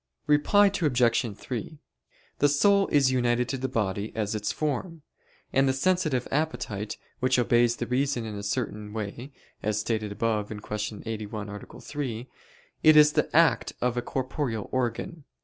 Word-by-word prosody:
Reply 150 Hz, +8 st, +4 dB, 0.2 s
Obj. 120 Hz, -, +2 dB
3: 130 Hz, +7 st, -6 dB, 0.6 s
The 145 Hz, -, +4 dB
soul 200 Hz, +7 st, +4 dB
is 140 Hz, -3 st, +3 dB
united 120 Hz, -1 st, +1 dB
to 135 Hz, -, -1 dB
the 130 Hz, -, -1 dB
body 105 Hz, -4 st, -2 dB
as 105 Hz, -2 st, -1 dB
its 105 Hz, -1 st, -1 dB
form; 155 Hz, +2 st, -3 dB, 0.5 s
and 135 Hz, 0 st, +4 dB
the -, -, +2 dB
sensitive 155 Hz, -4 st, +1 dB
appetite, 125 Hz, -9 st, -2 dB, 0.2 s
which 130 Hz, 0 st, +2 dB
obeys 120 Hz, -1 st, +3 dB
the 120 Hz, -, -3 dB
reason 125 Hz, -1 st, 0 dB
in 110 Hz, -, -5 dB
a 100 Hz, -, -5 dB
certain 105 Hz, -1 st, -3 dB
way, 110 Hz, +5 st, -5 dB, 0.3 s
as 105 Hz, 0 st, 0 dB
stated 105 Hz, -1 st, -2 dB
above 105 Hz, 0 st, -1 dB, 0.2 s
(Q. 105 Hz, 0 st, -4 dB
81, 105 Hz, -1 st, -5 dB
A. 105 Hz, 0 st, -9 dB
3), 130 Hz, -5 st, -5 dB, 0.5 s
it 155 Hz, 0 st, +7 dB
is 150 Hz, 0 st, +8 dB
the -, -, +1 dB
act -, -, +3 dB
of 125 Hz, 0 st, 0 dB
a 120 Hz, -, 0 dB
corporeal 130 Hz, -4 st, -3 dB
organ. 130 Hz, +7 st, -2 dB
120 Hz, 155 wpm, -27 LUFS, 110-145 Hz, 0.6 s, is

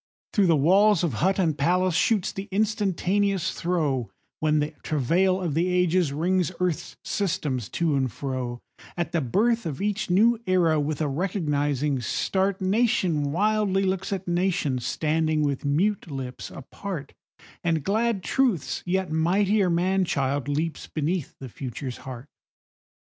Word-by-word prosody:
Through 200 Hz, -3 st, +4 dB
the 165 Hz, -, +5 dB
walls 190 Hz, +6 st, +4 dB
of 165 Hz, -7 st, 0 dB
hut 190 Hz, +3 st, +2 dB
and 165 Hz, -6 st, +1 dB
palace 180 Hz, +5 st, +2 dB
shoots 190 Hz, +3 st, +2 dB
the 195 Hz, +1 st, -6 dB
instantaneous 200 Hz, -2 st, 0 dB
throe, 150 Hz, -, -1 dB, 0.3 s
When 155 Hz, 0 st, +2 dB
the 150 Hz, +1 st, 0 dB
travail 175 Hz, +7 st, +1 dB
of 175 Hz, -5 st, -2 dB
the 170 Hz, +4 st, +1 dB
Ages 180 Hz, -3 st, +2 dB
wrings 180 Hz, +4 st, +1 dB
earth's 180 Hz, -4 st, -2 dB
systems 145 Hz, -, -2 dB
to 165 Hz, -4 st, 0 dB
and 130 Hz, -3 st, 0 dB
fro; 125 Hz, -2 st, -4 dB, 0.4 s
At 175 Hz, -, -2 dB
the 165 Hz, -, +1 dB
birth 220 Hz, -, +1 dB
of 140 Hz, -4 st, -5 dB
each 205 Hz, 0 st, -1 dB
new 220 Hz, +6 st, +4 dB
Era, 170 Hz, -4 st, +3 dB
with 150 Hz, +1 st, -2 dB
a 155 Hz, -, +1 dB
recognizing 145 Hz, -4 st, 0 dB
start, 190 Hz, +8 st, 0 dB
Nation 185 Hz, -8 st, +1 dB
wildly 200 Hz, +2 st, +1 dB
looks 190 Hz, 0 st, -1 dB
at 190 Hz, -2 st, -3 dB
nation, 175 Hz, -7 st, 0 dB
standing 155 Hz, +4 st, 0 dB
with 140 Hz, -1 st, -1 dB
mute 180 Hz, +7 st, +1 dB
lips 130 Hz, -3 st, -6 dB
apart, 155 Hz, +3 st, -7 dB, 0.5 s
And 165 Hz, -4 st, +1 dB
glad 215 Hz, +2 st, 0 dB
Truth's 245 Hz, -, 0 dB
yet 185 Hz, -2 st, 0 dB
mightier 190 Hz, +5 st, +2 dB
man 185 Hz, +3 st, +2 dB
child 140 Hz, -3 st, -1 dB
leaps 155 Hz, +3 st, -2 dB
beneath 160 Hz, +1 st, -2 dB
the 135 Hz, -, -7 dB
Future's 125 Hz, +1 st, -6 dB
heart. 130 Hz, -1 st, -8 dB
175 Hz, 145 wpm, -25 LUFS, 145-190 Hz, 0.5 s, the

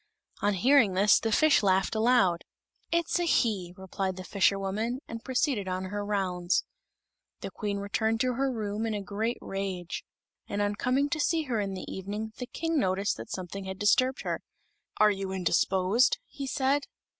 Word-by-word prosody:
On 205 Hz, 0 st, +2 dB
hearing 230 Hz, -1 st, +4 dB
this 200 Hz, +2 st, +5 dB
the 225 Hz, -, -1 dB
fish 310 Hz, +7 st, +5 dB
laughed 190 Hz, 0 st, +2 dB
aloud. 220 Hz, -6 st, +3 dB, 0.5 s
"It's 340 Hz, +1 st, +1 dB
a -, -, +1 dB
he," 200 Hz, -, +1 dB
replied 190 Hz, 0 st, -3 dB
the 185 Hz, -, -7 dB
fisherwoman, 200 Hz, +6 st, 0 dB
and 230 Hz, 0 st, -7 dB
proceeded 255 Hz, -6 st, 0 dB
on 185 Hz, 0 st, -2 dB
her 205 Hz, 0 st, -2 dB
rounds. 185 Hz, -3 st, 0 dB, 0.8 s
The -, -, -5 dB
Queen 205 Hz, -2 st, -3 dB
returned 220 Hz, +3 st, 0 dB
to 255 Hz, -1 st, +1 dB
her 270 Hz, +2 st, 0 dB
room 215 Hz, -1 st, -2 dB
in 220 Hz, -, -1 dB
a 205 Hz, -, -4 dB
great 220 Hz, +5 st, -2 dB
rage; 190 Hz, -3 st, -4 dB, 0.4 s
and 205 Hz, -, -3 dB
on 205 Hz, 0 st, +1 dB
coming 255 Hz, +6 st, +1 dB
to 310 Hz, -, -2 dB
see 320 Hz, +2 st, +1 dB
her 245 Hz, -6 st, -1 dB
in 195 Hz, -2 st, -2 dB
the 185 Hz, -, -6 dB
evening, 210 Hz, +3 st, -5 dB
the 250 Hz, -, -4 dB
King 325 Hz, +2 st, -1 dB
noticed 195 Hz, -1 st, +1 dB
that 115 Hz, +1 st, -8 dB
something 190 Hz, +1 st, -5 dB
had 190 Hz, 0 st, -5 dB
disturbed 255 Hz, +6 st, +2 dB
her. -, -, -2 dB, 0.6 s
"Are 215 Hz, 0 st, +5 dB
you 195 Hz, -1 st, -3 dB
indisposed?" 190 Hz, +5 st, +2 dB
he 275 Hz, -, -7 dB
said. 280 Hz, +1 st, +1 dB
205 Hz, 175 wpm, -28 LUFS, 190-250 Hz, 0.8 s, this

